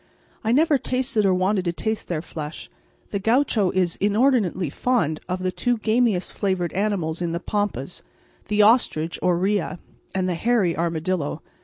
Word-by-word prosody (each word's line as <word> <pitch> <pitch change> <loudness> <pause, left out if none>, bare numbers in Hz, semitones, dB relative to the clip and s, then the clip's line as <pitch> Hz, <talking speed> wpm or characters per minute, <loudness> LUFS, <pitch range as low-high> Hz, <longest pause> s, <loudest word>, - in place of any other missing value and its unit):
I 225 - +1
never 295 +2 +4
tasted 250 -5 0
or 190 - +4
wanted 185 +1 +1
to 170 - +1
taste 220 +4 -3
their 160 -3 -2
flesh. 155 -3 -7 0.4
The 200 - -1
gaucho 225 -2 +2
is 180 -2 0
inordinately 205 - +2
fond 165 - 0
of 185 +1 -2
the 185 - 0
two 245 +5 0
gamiest 220 -3 +1
flavoured 185 -4 -1
animals 185 -5 -1
in 170 -1 -1
the 170 - -1
pampas 180 - -3 0.5
the 210 0 +3
ostrich 205 -8 +3
or 180 -1 +2
rhea 190 0 0 0.4
and 185 -1 +1
the 180 - 0
hairy 195 -2 +1
armadillo. 165 -2 -2
190 Hz, 160 wpm, -23 LUFS, 170-220 Hz, 0.5 s, never